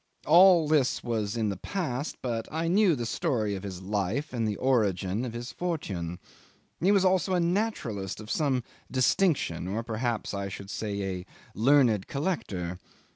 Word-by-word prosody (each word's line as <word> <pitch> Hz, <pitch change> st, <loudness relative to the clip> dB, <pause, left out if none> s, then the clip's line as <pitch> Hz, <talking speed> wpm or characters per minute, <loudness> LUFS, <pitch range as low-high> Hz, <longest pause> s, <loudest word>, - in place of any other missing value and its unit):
All 175 Hz, 0 st, +7 dB
this 145 Hz, -4 st, +2 dB
was 110 Hz, -2 st, -2 dB
in 110 Hz, -2 st, +1 dB
the 100 Hz, -, -3 dB
past, 145 Hz, -, -3 dB
but 115 Hz, -3 st, -2 dB
I 160 Hz, +2 st, -1 dB
knew 185 Hz, -1 st, +4 dB
the 120 Hz, -3 st, -3 dB
story 115 Hz, -6 st, 0 dB
of 95 Hz, -, -4 dB
his 95 Hz, -2 st, -7 dB
life 105 Hz, -, -2 dB
and 115 Hz, -3 st, 0 dB
the 105 Hz, -, -1 dB
origin 105 Hz, -4 st, +1 dB
of 120 Hz, -, -5 dB
his 120 Hz, +1 st, -5 dB
fortune. 95 Hz, -, -3 dB, 0.6 s
He 185 Hz, +4 st, +3 dB
was 195 Hz, -2 st, +4 dB
also 185 Hz, 0 st, +2 dB
a -, -, +2 dB
naturalist 170 Hz, -, -1 dB
of 105 Hz, -1 st, -7 dB
some 135 Hz, -5 st, +1 dB, 0.3 s
distinction, 130 Hz, -, +1 dB
or 105 Hz, +5 st, -2 dB
perhaps 115 Hz, 0 st, -2 dB
I 100 Hz, 0 st, -3 dB
should 100 Hz, +1 st, -8 dB
say 100 Hz, -2 st, -3 dB, 0.2 s
a 90 Hz, -, -10 dB, 0.3 s
learned 120 Hz, -3 st, +4 dB
collector. 100 Hz, -, -3 dB
120 Hz, 165 wpm, -28 LUFS, 100-160 Hz, 0.6 s, All